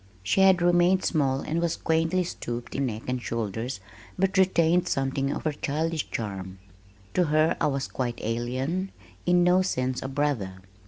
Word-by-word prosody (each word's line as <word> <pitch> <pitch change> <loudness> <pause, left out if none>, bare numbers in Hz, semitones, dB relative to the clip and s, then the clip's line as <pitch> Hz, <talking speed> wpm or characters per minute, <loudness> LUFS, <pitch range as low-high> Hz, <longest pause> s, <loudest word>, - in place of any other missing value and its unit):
She 100 - +2
had 190 -2 +5
remained 175 +2 +4
small 135 -4 +1
and 165 +2 -2
was 170 -1 0
quaintly 165 +3 +1
stooped 120 -8 -5
in 135 -1 0
neck 110 -1 -5
and 125 0 -1
shoulders 115 +1 -3 0.4
but 190 +1 +1
retained 180 -2 +3
something 135 -1 0
of - - -4
her 155 - +1
childish 155 +2 -2
charm. 95 -4 -5 0.6
To 180 - +3
her 155 +1 +3
I - - +4
was 135 -2 -1
quite 120 -2 -3
alien, 130 - -2 0.4
in 175 0 +5
no 180 +1 +4
sense 130 -8 -1
a - - -4
brother. 135 -9 -1
145 Hz, 165 wpm, -26 LUFS, 125-175 Hz, 0.6 s, had